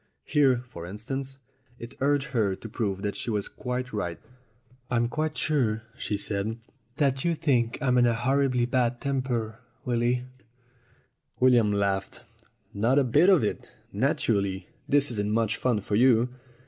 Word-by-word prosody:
Here, 130 -4 +3
for 85 -7 -9
instance, 135 - -5 0.4
it 120 +2 -9
urged 140 -1 +1
her 110 -7 +1
to 110 - -9
prove 100 -3 -3
that 100 -1 -2
she - - -4
was 105 -3 -1
quite 125 0 -4
right. 90 -6 -3 0.7
"I'm 120 -1 +1
quite 155 +5 -2
sure," 115 -8 +1
she 105 -4 -3
said, 105 +2 -3 0.4
"that 135 -3 +1
you 170 -1 +1
think 125 -7 +1
I'm 125 -2 +3
in 120 - +5
a 120 - +2
horribly 130 0 +1
bad 120 -1 0
temper, 125 -5 -2 0.3
Willy." 120 0 +1 1.2
William 120 -4 +5
laughed. 100 -1 -1 0.5
"Not 115 +7 +2
a 140 - +5
bit 135 +9 +4
of 185 - +5
it. 105 - -3 0.2
Naturally, 105 - 0 0.2
this 145 -1 +3
isn't 105 -2 -2
much 115 0 +1
fun 120 -5 0
for 100 - -2
you." 120 +1 +4
120 Hz, 150 wpm, -27 LUFS, 105-135 Hz, 1.2 s, in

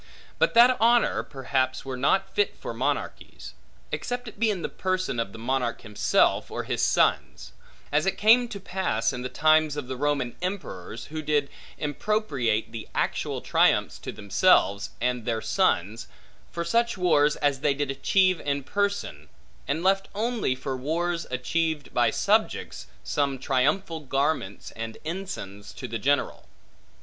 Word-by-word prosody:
But - - +2
that 245 +2 +7
honor, 235 +1 +4
perhaps 130 -1 -2
were 135 -1 -4
not 190 +10 +1
fit 415 -1 +1
for - - -6
monarchies; - - -4 0.4
except 245 0 -3
it 215 - -10
be 225 -1 +3
in 190 -5 -2
the - - 0
person 185 -9 -2
of 115 -4 -2
the 115 - -10
monarch 120 0 -1
himself, 105 -3 +1
or - - -4
his - - -2
sons; - - +1 0.4
as 150 +4 +2
it 195 - 0
came 235 +3 +5
to 200 - -7
pass 185 - -1
in 125 - -5
the 125 - -4
times 155 0 +3
of 145 -4 -4
the 130 - -4
Roman 140 -2 -1
emperors, 120 - -5
who 155 - -3
did 145 -2 0 0.3
impropriate 140 - -1
the 115 -2 -7
actual - - -1
triumphs - - +2
to - - -6
themselves, 100 - +2
and 125 0 -1
their 115 -1 -1
sons, 110 +1 0 0.4
for 170 0 -3
such 235 +4 +1
wars 150 -5 +3
as 145 -2 0
they 140 0 +1
did 140 -1 -1
achieve 185 +6 +2
in 140 -1 -2
person; 200 - -2 0.4
and 155 +4 -1
left 195 +1 +2
only, 225 - 0
for 130 +1 -4
wars 165 +6 -2
achieved 150 +4 -2
by - - +3
subjects, - - 0 0.2
some 140 -2 0
triumphal 150 +7 0
garments 140 -7 -2
and 115 0 -6
ensigns 160 - -6
to - - -7
the 115 0 -4
general. 145 +6 0
145 Hz, 155 wpm, -26 LUFS, 125-185 Hz, 0.4 s, that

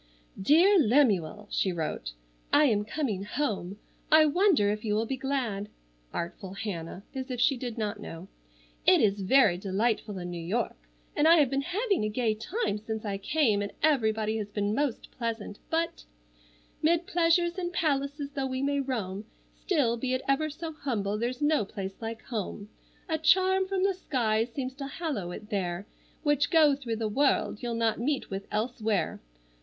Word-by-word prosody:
"DEAR 345 - +6
LEMUEL:" 210 - +2
she 190 - +1
wrote:— 155 - -3 0.4
"I 300 - +6
am 210 -6 +2
coming 215 -6 -2
home. 205 -6 -2 0.3
I 310 0 +8
wonder 305 - +3
if 210 0 -4
you 210 -2 0
will 220 +2 +1
be 265 - -2
glad? 245 -7 -2 0.4
(Artful 185 +2 -5
Hannah, 190 -3 -5
as 265 -1 -5
if 250 -2 -3
she 270 +3 +4
did 245 -2 -5
not 210 -1 -2
know!) 170 -3 -8 0.6
"It - - +7
is 200 -1 +2
very 195 -3 +4
delightful 205 +1 -1
in 175 -1 -5
New 170 -1 -5
York 215 +8 -1 0.4
and 300 - +4
I 335 - +8
have 290 -5 +4
been 275 0 +1
having 395 - 0
a 215 - 0
gay 220 0 +1
time 220 - -2
since 220 0 -5
I 200 -1 -2
came, 220 -2 +2
and 205 - -4
everybody 220 -7 +2
has 210 -2 -4
been 205 0 -1
most 275 -1 -2
pleasant, 230 -4 -4
but— 330 +1 -1 0.8
"'Mid 335 +2 +3
pleasures 345 +1 +2
and 350 -1 -2
palaces 285 -3 -1
though 275 -2 -2
we 260 +1 -2
may 280 0 +1
roam, 215 -7 -3 0.3
Still, 275 - +1
be 255 +2 -1
it 255 - -3
ever 275 +3 +2
so 320 +2 -6
humble, 225 -10 -2
there's 245 +4 -2
no 300 -4 +3
place 195 0 -7
like 225 0 -5
home. 210 -2 -5 0.4
A 320 -3 -1
charm 375 +3 +4
from 380 -1 0
the 390 0 +3
skies 235 -9 0
seems 260 0 -4
to 275 -1 -5
hallow 275 - -3
it 210 +5 -9
there, 185 -1 -2 0.4
Which, 295 -1 +2
go 310 -4 +5
through 250 -5 -4
the 220 0 -2
world, 265 -1 +1
you'll 240 -1 -2
not 225 -2 +1
meet 270 0 -1
with 195 +1 -5
elsewhere. 220 -1 -1
235 Hz, 175 wpm, -28 LUFS, 205-295 Hz, 0.8 s, I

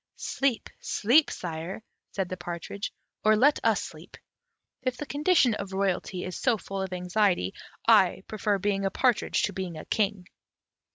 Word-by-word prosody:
"Sleep, 270 -4 -1
sleep, 265 +8 +3
sire," 170 +4 -5 0.3
said 190 -2 -1
the 185 - -4
partridge, 175 +3 -5 0.3
"or 215 0 +5
let 275 +7 +4
us - - +3
sleep: - - -11 0.6
if 255 -1 -2
the 295 - -5
condition 290 -4 +3
of 200 -2 -5
royalty 190 -1 -1
is 185 - -5
so 245 -4 +2
full 195 -1 -5
of 190 -1 -3
anxiety, 180 - +1 0.3
I - - +5
prefer 210 -1 0
being 195 0 0
a 195 - +2
partridge 245 +4 +1
to 205 - 0
being 180 -3 -4
king." 205 -4 0
200 Hz, 155 wpm, -28 LUFS, 185-230 Hz, 0.6 s, or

